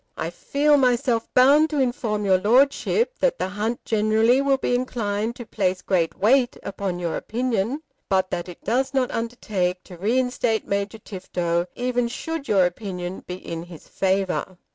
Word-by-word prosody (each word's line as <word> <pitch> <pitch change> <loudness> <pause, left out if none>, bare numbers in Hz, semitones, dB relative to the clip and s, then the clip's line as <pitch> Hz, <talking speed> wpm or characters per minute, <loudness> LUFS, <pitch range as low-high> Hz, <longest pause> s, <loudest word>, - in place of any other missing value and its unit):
I - - -3
feel 295 +1 +2
myself 245 -3 +1
bound 285 +5 +6
to 300 -2 -1
inform 240 -5 0
your 190 -2 +4
Lordship 275 - +2
that - - +2
the 185 - -2
hunt 215 +4 -3
generally 220 +4 +3
will 275 -1 +2
be 255 - -1
inclined 230 -3 -1
to 240 - -8
place 185 -3 -1
great 170 -4 0
weight 245 +4 +3
upon 195 -2 -3
your 170 -2 -2
opinion; 240 +4 -2 0.3
but 190 -1 +1
that 175 +1 -3
it 175 - -12
does 260 +5 0
not 255 -2 +1
undertake 205 -6 -2
to 180 - -12
reinstate 235 +2 0
Major 200 +2 -2
Tifto, 175 -4 -2
even 245 -1 0
should 305 +4 -5
your 195 -3 +4
opinion 180 -1 -4
be 180 - -4
in 165 -2 -6
his 170 -2 -12
favour. 190 -1 -1
220 Hz, 165 wpm, -23 LUFS, 185-255 Hz, 0.3 s, bound